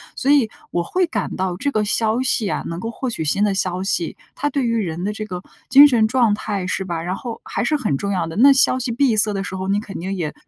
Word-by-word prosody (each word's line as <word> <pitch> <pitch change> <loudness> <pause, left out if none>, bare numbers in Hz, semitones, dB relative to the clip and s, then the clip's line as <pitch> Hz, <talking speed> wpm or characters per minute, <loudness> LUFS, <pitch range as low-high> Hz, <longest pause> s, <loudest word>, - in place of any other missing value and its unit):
所 275 - -2
以 275 -7 +4 0.2
我 175 - -1
会 365 - 0
感 215 -10 -3
到 185 -1 -2
这 285 +8 -1
个 215 -4 0
消 220 +3 +1
息 245 -4 +1
啊- - - -2
能 165 +1 -5
够 225 +5 -5
获 255 +3 -4
取 225 - -3
新 195 +7 +1
的 205 -1 +2
消 185 -1 -1
息- 180 -4 -1 0.2
它 290 +2 -1
对 275 -2 -1
于 230 0 0
人 175 -5 -3
的 205 - -1
这 215 0 -6
个 180 -4 -6 0.3
精 285 +2 +9
神 235 -5 +2
状 235 -2 +2
态 205 -3 -4
是 190 0 -2
吧， 170 -3 -4
然 180 +3 -3
后 235 +2 -7
还 - - -3
是 270 +6 +1
很 220 - -1
重 200 +5 -3
要 180 -4 -1
的。 165 - -8
那 275 +6 +6
消 265 -1 +4
息 250 -1 -2
闭 240 0 +2
塞 210 0 +6
的 195 -1 -3
时 190 - -6
候， 190 0 -4
你 200 +1 +1
肯 210 -1 -8
定 190 +3 -4
也 165 -6 -4
210 Hz, 300 characters per minute, -20 LUFS, 185-240 Hz, 0.3 s, 精